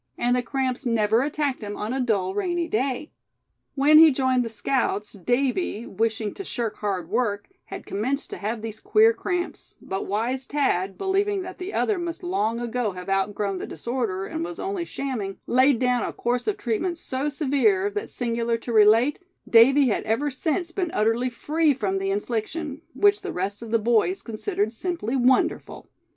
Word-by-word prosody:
And 245 +1 +2
the 250 - +1
cramps 260 +1 -2
never 225 -2 +2
attacked 285 -2 -1
him 205 -1 -5
on 215 +4 -3
a 265 - -1
dull, 200 -7 0
rainy 345 - -1
day. 260 +3 -1 0.6
When 300 +2 +6
he 320 0 +9
joined 260 -2 +1
the 230 - -4
scouts 210 -2 -1
Davy, 245 - -1
wishing 220 0 -1
to 390 - -7
shirk 235 - -3
hard 190 -5 -2
work, 205 -1 -1 0.2
had - - -8
commenced 260 +8 -2
to - - -5
have 215 +2 -3
these 220 -1 -6
queer 445 +2 +4
cramps; 355 -4 -4
but 190 0 -4
wise 240 +6 -2
Thad, 195 -10 0
believing 390 0 0
that 370 +1 -9
the 370 +2 -5
other 420 -4 +1
must 340 +1 -5
long 230 - 0
ago 240 -3 -2
have 180 +1 -8
outgrown 195 0 0
the - - -5
disorder, 210 - -3
and 160 - -4
was 175 0 -6
only 385 -3 -3
shamming, 240 - -4
laid 260 +1 +4
down 250 0 +1
a - - -2
course 245 +1 -2
of 420 -1 0
treatment 340 - -1
so 275 -2 -3
severe 260 - +2
that, 205 0 -4
singular 235 -1 -1
to 235 +1 -6
relate, 225 +6 +5 0.3
Davy 265 +4 +6
had 210 - 0
ever 265 +7 0
since 330 +6 -1
been 360 -1 -2
utterly 225 +4 +2
free 300 +4 +1
from 195 -5 -1
the 195 0 -2
infliction; 245 +9 -3
which 410 0 +4
the - - -4
rest 195 +4 -3
of 230 - -7
the 230 - +3
boys 235 - +1
considered 220 - -2
simply 300 - -3
wonderful. 255 0 +1
245 Hz, 180 wpm, -24 LUFS, 210-290 Hz, 0.6 s, he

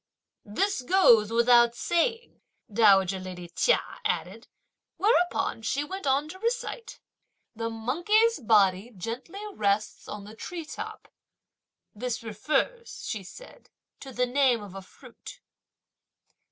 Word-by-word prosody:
"This 390 - 0
goes 245 - +5
without 235 0 +5
saying!" 455 - -1 0.3
dowager 195 -3 +4
lady 180 -2 -8
Chia - - +3 0.2
added; - - -3 0.5
whereupon 360 - +1
she 270 +5 -1
went 380 +1 -6
on 275 +3 +2
to 375 +3 -10
recite: 465 0 -3 0.6
The 230 +1 -3
monkey's 345 - +1
body 205 -2 +3
gently 250 - -6
rests 210 - -1
on 210 -1 -7
the 210 +2 -11
tree 335 +7 -7
top! 435 +7 -8 0.9
"This 240 +2 -4
refers," 305 - -2
she 215 - -3
said, 340 - -14 0.3
"to 270 - -9
the 250 0 0
name 250 -3 +2
of 200 -3 -10
a 195 - -7
fruit." 190 - -14
245 Hz, 120 wpm, -27 LUFS, -, 0.9 s, goes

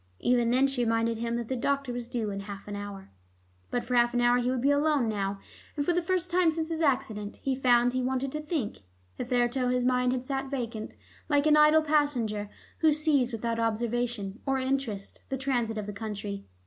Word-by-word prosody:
Even 240 - +2
then 255 +3 +4
she 270 -3 0
reminded 230 0 +1
him 235 0 -1
that 235 -1 -3
the 260 - -2
doctor 275 0 -1
was 240 -1 -5
due 235 -4 -2
in 200 - -4
half 200 0 -8
an 205 - -5
hour. 200 - -7 0.6
But 245 - -1
for 250 - -4
half 240 0 +3
an 245 - +3
hour 240 +1 +4
he 245 0 0
would 255 -1 -1
be 280 - +4
alone 285 -3 +2
now, 200 -2 -2 0.4
and 285 - 0
for 350 - +2
the 355 - +2
first 360 0 -1
time 350 -2 +4
since 320 0 -3
his 325 0 -2
accident 255 -8 0
he 270 - +1
found 245 -2 +3
that 255 - -3
he - - +1
wanted 260 +1 -1
to 305 - -4
think. 300 -8 -3 0.3
Hitherto 245 - 0
his 250 0 +1
mind 250 0 +2
had 255 0 -2
sat 270 0 -3
vacant, 235 -5 -4 0.3
like 290 -1 +3
an 305 -1 +6
idle 300 +1 +6
passenger 250 -9 +1 0.3
who 315 -1 +5
sees 295 -4 +2
without 230 0 -2
observation 230 -2 -1
or 270 0 +2
interest 260 -6 -2
the 270 - -2
transit 245 -4 -1
of 210 - -3
the 210 - -5
country. 200 -1 -5
245 Hz, 215 wpm, -28 LUFS, 225-275 Hz, 0.6 s, an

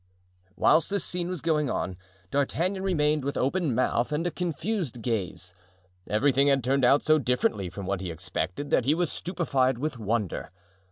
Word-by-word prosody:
Whilst 160 +9 +4
this 200 -2 -1
scene 175 -1 -2
was 180 -5 -3
going 150 -4 +1
on, 90 - -2 0.4
D'Artagnan 170 +7 0
remained 150 -6 +1
with 140 +1 -2
open 140 -1 0
mouth 125 +1 +1
and 150 +3 -1
a 175 - 0
confused 170 - -3
gaze. 95 -5 -3 0.6
Everything 135 +6 +3
had 135 -2 +3
turned 135 +2 +1
out 135 +4 +5
so 155 0 +4
differently 120 -7 0
from 100 +2 -7
what 95 0 -2
he 90 - -4
expected 90 - -4
that 120 - +3
he 145 +4 +3
was 175 -1 0
stupefied 140 -8 0
with 145 -1 -3
wonder. 105 -3 -2
140 Hz, 170 wpm, -27 LUFS, 115-165 Hz, 0.6 s, out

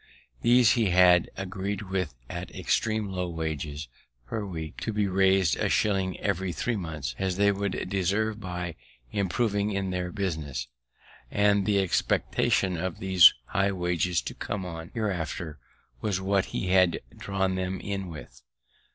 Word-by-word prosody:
These 120 -2 +6
he 115 -5 +2
had 90 -1 +5
agreed 100 +1 -3
with 95 -8 -2
at - - -6
extream 110 -2 0
low 90 -1 -2
wages 80 -2 -4 0.4
per 110 - -3
week 80 -5 -6
to 115 - -2
be 105 -1 +1
rais'd 95 -2 +3
a - - 0
shilling 95 -3 +1
every 95 -2 -1
three 120 +7 -1
months, 80 - -4
as 95 -1 -1
they 100 0 +4
would 100 -1 -2
deserve 100 +3 0
by 90 -3 -4 0.4
improving 100 +1 0
in 100 -2 -2
their 90 -1 -2
business; 75 -10 -3 0.6
and 100 -1 +3
the 105 -1 +3
expectation 95 0 +1
of 90 +1 -3
these 95 -3 +7
high 100 +4 +1
wages, 90 -1 0
to - - -5
come 100 -3 -4
on 80 -2 -7
hereafter, 90 -7 -3 0.4
was 100 -3 0
what 95 0 +1
he 90 - -3
had 90 -2 +4 0.2
drawn 95 -1 -1
them 95 0 -2
in 100 -2 -4
with. 75 -7 -10
95 Hz, 150 wpm, -27 LUFS, 85-100 Hz, 0.6 s, these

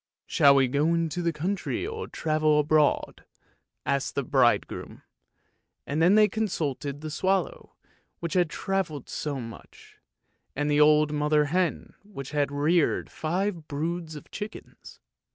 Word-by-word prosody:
" - - -67
Shall 140 -1 +5
we 135 -1 +4
go 145 +6 +1
into 165 +1 -1
the 170 -1 +1
country 180 - -2
or 445 +2 -5
travel 155 -1 +1
abroad? 150 0 +1 0.3
" - - -51
asked 140 -1 -1
the 140 - 0
bridegroom, 125 -2 0 0.8
and 150 +3 -2
then 180 +5 +5
they 215 0 +6
consulted 150 - -3
the 155 0 -6
swallow 195 - -1 0.4
which 170 -2 -4
had 180 -3 +2
travelled 170 -6 -3
so 145 -3 -3
much, 115 -2 -12 0.6
and 145 +1 0
the 145 0 +4
old 150 0 +5
mother 150 0 +2
hen 175 +4 -1
which 170 -11 -9
had 145 -2 0
reared 150 +3 +1
five 175 0 -2
broods 160 +2 -3
of 150 - -11
chickens. 210 +1 -9
155 Hz, 145 wpm, -27 LUFS, 145-175 Hz, 0.8 s, they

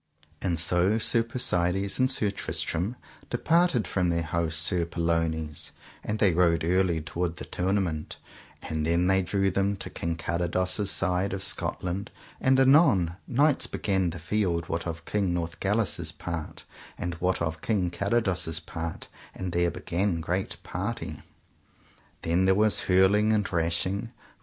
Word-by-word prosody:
And 85 -4 0
so 90 +5 +3
Sir 115 +1 +3
Persides 95 -4 0
and 130 0 +4
Sir 105 -6 +2
Tristram 100 +1 -2 0.3
departed 165 - +2
from 90 -2 +1
their 85 0 +1
host 80 0 -1
Sir 85 +2 +2
Pellounes, 80 -2 -1 0.3
and 105 - -2
they 100 -5 +3
rode 85 -1 +3
early 90 -1 +2
toward 85 +2 -3
the - - -7
tournament, 90 -4 -1 0.5
and 80 -1 -2
then 85 +3 +2
they 95 +1 +3
drew 95 +1 +1
them 100 +2 +1
to - - -7
King 85 0 -3
Carados' 90 +5 -1
side, 90 +1 0
of 95 -1 -3
Scotland; 95 +3 -3 0.3
and 130 0 +3
anon 130 - +5
knights 145 +3 +2
began 95 -3 0
the 85 - -6
field 85 -1 -1
what 80 +1 -2
of 85 0 -6
King 100 -4 0
Northgalis' 85 +1 -1
part, 85 0 -6 0.3
and 90 - -3
what 90 +1 +1
of 80 -2 -2
King 95 -6 0
Carados' 95 -5 0
part, 80 0 -6 0.3
and 95 -1 -4
there 85 0 +2
began 90 +1 -1
great 90 +4 -2
party. - - -4 1.0
Then 85 +3 +2
there 95 0 +4
was 105 +1 +3
hurling 100 +4 +5
and 105 -2 +2
rashing. 90 +4 -1
90 Hz, 145 wpm, -27 LUFS, 85-100 Hz, 1.0 s, anon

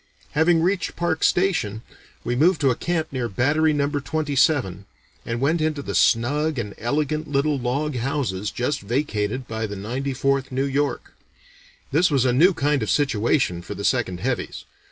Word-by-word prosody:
Having 160 +1 +3
reached 185 0 0
Parke 170 -2 -1
Station, 125 - +1 0.4
we 120 - -1
moved 165 +6 +3
to 135 -2 +4
a - - 0
camp 165 +1 -2
near 125 -3 -2
Battery 145 +10 +2
Number 145 0 0
Twenty 150 0 -2
seven, 100 - +1 0.4
and 115 0 -2
went 155 +5 +1
into 155 -2 -1
the - - -5
snug 145 +6 +2
and 105 -4 -4
elegant 150 +5 -1
little 145 0 +1
log 135 +4 -1
houses 115 -6 -2
just 140 +4 -2
vacated 120 0 -2
by 110 0 -3
the 100 - -6
Ninety 130 +7 -3
fourth 135 0 0
New 135 +2 0
York. 140 +1 -2 0.8
This 170 +5 +3
was 135 -4 +2
a 125 - +3
new 170 +9 +5
kind 145 -1 +1
of 110 - -2
situation 120 - +1
for - - -7
the - - -5
'Second 90 -1 0
Heavies.' 125 +2 -3
140 Hz, 175 wpm, -23 LUFS, 120-155 Hz, 0.8 s, new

